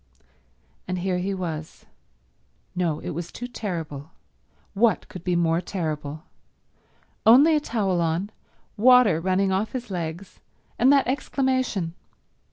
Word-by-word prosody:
And 185 0 -2
here 180 0 -1
he 190 +2 -2
was... 160 -4 -6 0.9
no, 170 -4 0
it - - -5
was 170 +2 -5
too 245 - -6
terrible, 165 - -5 0.6
what 220 +2 +2
could 185 - -9
be 180 -1 0
more 170 0 +2
terrible? 155 -4 -4 1.0
Only 280 +8 +7
a - - +3
towel 200 -10 -1
on, 170 +5 -1 0.5
water 235 -7 +6
running 190 +2 +1
off 195 +3 -1
his 245 -4 -5
legs, 170 +1 -5 0.4
and 255 +3 +6
that 280 -1 +4
exclamation. 260 - -1
185 Hz, 125 wpm, -24 LUFS, 165-230 Hz, 1.0 s, Only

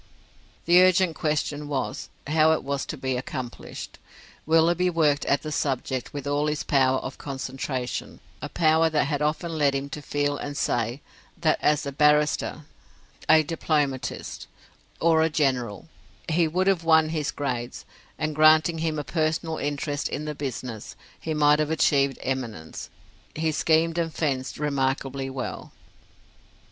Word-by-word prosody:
The 175 +2 +7
urgent 185 -2 +4
question 150 -1 -1
was, 135 -3 -3 0.2
how 155 +2 +4
it 160 - -2
was 140 0 -3
to 155 - -5
be 130 -1 -2
accomplished. 125 -1 -7 0.5
Willoughby 170 +3 +3
worked 150 -5 +2
at 140 - +1
the 155 - -5
subject 130 -3 -2
with 145 -2 -6
all 145 +1 0
his 150 -1 -1
power 130 -2 +3
of 130 - -7
concentration: 130 -2 -4 0.2
a - - -5
power 160 0 +3
that 155 -1 +2
had 145 0 -2
often 160 +2 -1
led 140 -2 +3
him 140 +1 -3
to 150 +2 -6
feel 145 0 -1
and 145 -1 -5
say, 120 0 -1 0.4
that - - +1
as 150 0 +2
a 140 - -3
barrister, 150 +1 +2 0.6
a 160 0 +7
diplomatist, 150 -4 -2 0.5
or 165 -1 +4
a 160 - +3
general, 130 -8 -1 0.4
he 165 0 +2
would 180 +4 0
have 190 -4 +2
won 160 -1 +4
his 155 -2 -2
grades: 125 -4 -4 0.3
and 155 -1 -2
granting 155 +2 +5
him 160 -1 -1
a 150 - -2
personal 160 +1 -1
interest 145 0 -2
in 150 - -4
the 150 - -3
business, 125 -5 -6 0.2
he 160 -1 -3
might 150 0 +4
have 155 -1 0
achieved 140 -4 +2
eminence: 115 -11 -4 0.5
he 160 0 0
schemed 165 +2 +2
and 165 -1 -2
fenced 135 -4 -2
remarkably 135 -2 -1
well. 130 -1 -6
150 Hz, 150 wpm, -25 LUFS, 135-160 Hz, 0.6 s, The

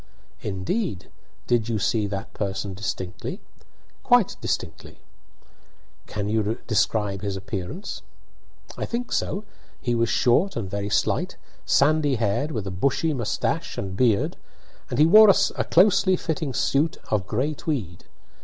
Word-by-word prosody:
"Indeed! 100 - -3 0.3
Did 120 -2 +1
you 115 - 0
see 105 +1 +1
that 100 -1 -5
person 100 -1 -3
distinctly?" 95 -2 -5 0.6
"Quite - - +3
distinctly." - - -4 1.1
"Can 105 -1 -3
you 110 +1 0
describe 105 -2 0
his 100 -2 -3
appearance?" 95 - -5 0.7
"I - - -3
think 240 +1 -4
so. 200 +3 -1 0.4
He 120 - -1
was 115 -1 +1
short 155 +11 +3
and 115 -5 -3
very 100 +1 -3
slight, - - 0 0.3
sandy 145 -1 +3
haired, 115 +6 0
with 110 -9 -3
a 95 - -4
bushy 140 - 0
moustache 120 -6 -2
and 95 -1 -4
beard, 110 -2 +2 0.5
and 120 - -3
he 150 - +6
wore 215 +5 +8
a 200 0 +3
closely 190 +1 +4
fitting 160 -4 -2
suit 145 +7 +1
of 100 -4 0
gray 130 +9 0
tweed. 120 - -4
115 Hz, 135 wpm, -24 LUFS, 100-155 Hz, 1.1 s, wore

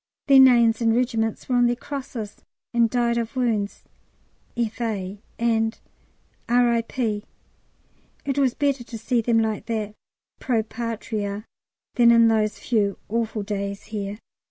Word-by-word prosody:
Their 275 -2 +7
names 235 -3 +6
and 225 -1 +3
regiments 230 -3 -1
were 250 - +1
on 245 0 +5
their 240 - +1
crosses, 250 -5 -6 0.4
and 235 -1 +3
"Died 235 -1 +1
of 230 +2 -4
wounds. 225 -5 -1 0.7
F.A.," 215 -4 -3 0.2
and 225 -1 +1 0.7
R.I.P. 235 -2 +1 1.0
It 275 0 -1
was 265 -3 +2
better 280 -3 0
to 235 -1 -8
see 230 +2 0
them 230 0 +2
like 220 0 -1
that 215 -3 -2 0.5
Pro 230 -4 0
Patria 220 -2 -4 0.5
than 240 -1 +5
in 230 -1 +6
those 215 -2 +1
few 205 -5 0
awful 225 -1 -1
days 200 -1 -4
here. 205 -1 -3
230 Hz, 130 wpm, -24 LUFS, 215-240 Hz, 1.0 s, Their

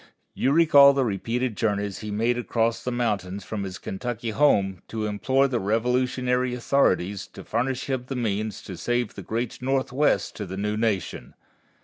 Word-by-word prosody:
You 135 - +1
recall 145 -3 +7
the 135 -2 +1
repeated 115 +3 -2
journeys 100 -2 -1
he 105 - -6
made 115 +4 +1
across 115 -1 -1
the 125 - -2
mountains 100 -5 -2
from 105 +1 -5
his 95 -2 -5
Kentucky 115 +2 -4
home 100 -8 +2
to 110 -1 -3
implore 130 +6 +2
the 125 -3 -1
Revolutionary 125 +3 0
authorities 105 -7 +1
to - - -11
furnish 130 +1 -2
him 130 -2 -2
the 135 - -4
means 110 -3 -2
to 95 - -8
save 120 +5 -1
the 100 - -8
great 115 +6 -4
Northwest 135 +2 +1
to 105 - -5
the 95 +2 -6
new 105 +1 -1
nation. 105 - -2
115 Hz, 165 wpm, -25 LUFS, 105-125 Hz, -, recall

